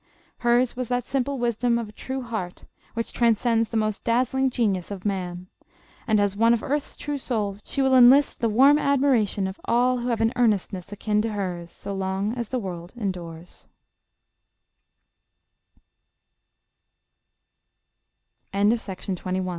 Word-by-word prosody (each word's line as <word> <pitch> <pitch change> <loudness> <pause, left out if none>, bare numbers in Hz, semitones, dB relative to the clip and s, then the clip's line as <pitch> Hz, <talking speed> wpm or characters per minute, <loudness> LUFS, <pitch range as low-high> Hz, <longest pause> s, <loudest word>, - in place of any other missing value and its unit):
Hers 240 +1 +2
was 250 -1 -3
that 245 +1 -1
simple 275 +2 -2
wisdom 240 0 +1
of 230 -3 -4
a - - -11
true 260 +4 -5
heart 220 -7 -5 0.3
which 230 0 -3
transcends 230 -1 +2
the 230 - -2
most 215 -1 -1
dazzling 255 +3 +1
genius 205 -8 -1
of 200 -1 -7
man. 180 -3 -3 0.6
And 215 -2 +3
as 200 -1 +1
one 230 +3 +4
of 225 - -5
earth's 290 +1 -2
true 290 -1 -4
souls, 210 -6 -2
she 275 - -1
will 265 0 +3
enlist 260 +3 +6
the 230 - +1
warm 275 +7 +5
admiration 260 -9 +2
of 190 +1 -6
all 250 +1 +2
who 240 - -4
have 235 -2 0
an 225 +2 +2
earnestness 200 -5 0
akin 210 +1 0
to 220 0 -2
hers, 180 -4 -4
so 200 - -7
long 195 +2 -2
as 235 -3 -4
the 260 - -1
world 180 -3 -6
end 200 -4 -1
230 Hz, 140 wpm, -24 LUFS, 200-250 Hz, 0.6 s, enlist